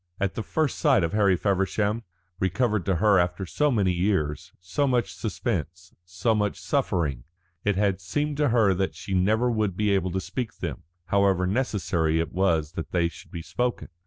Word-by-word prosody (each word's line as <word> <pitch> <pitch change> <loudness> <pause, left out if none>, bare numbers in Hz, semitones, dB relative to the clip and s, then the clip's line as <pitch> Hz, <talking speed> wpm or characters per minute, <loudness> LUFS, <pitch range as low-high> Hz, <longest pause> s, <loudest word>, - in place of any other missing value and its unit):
At 100 -1 0
the - - -3
first 155 +5 -1
sight 135 - +4
of 85 - -1
Harry 100 -3 +4
Feversham, 100 +3 0 0.4
recovered 105 +1 0
to 95 - +2
her 100 +2 +4
after 90 +2 0
so 150 - +1
many 100 -8 +2
years, 90 -5 -1
so 90 +11 -1
much 125 -2 +1
suspense, 90 -5 -4
so 90 +6 0
much 105 -2 -1
suffering, 70 -9 -1 0.4
it 105 -1 +1
had 100 -1 +1
seemed 145 +9 -2
to 145 -2 +2
her 110 -5 +4
that 95 +1 -1
she 95 - -6
never 110 +7 +2
would 105 -5 -1
be 105 -1 +2
able 95 -2 +1
to 95 +2 -1
speak 115 +4 -5
them, - - -5 0.2
however 100 -2 +2
necessary 90 -7 0
it 80 -1 -2
was 85 -5 +1
that 85 -1 -6
they 85 -2 +2
should 85 - -14
be 85 - -7
spoken. 125 +6 -2
95 Hz, 185 wpm, -26 LUFS, 90-110 Hz, 0.4 s, sight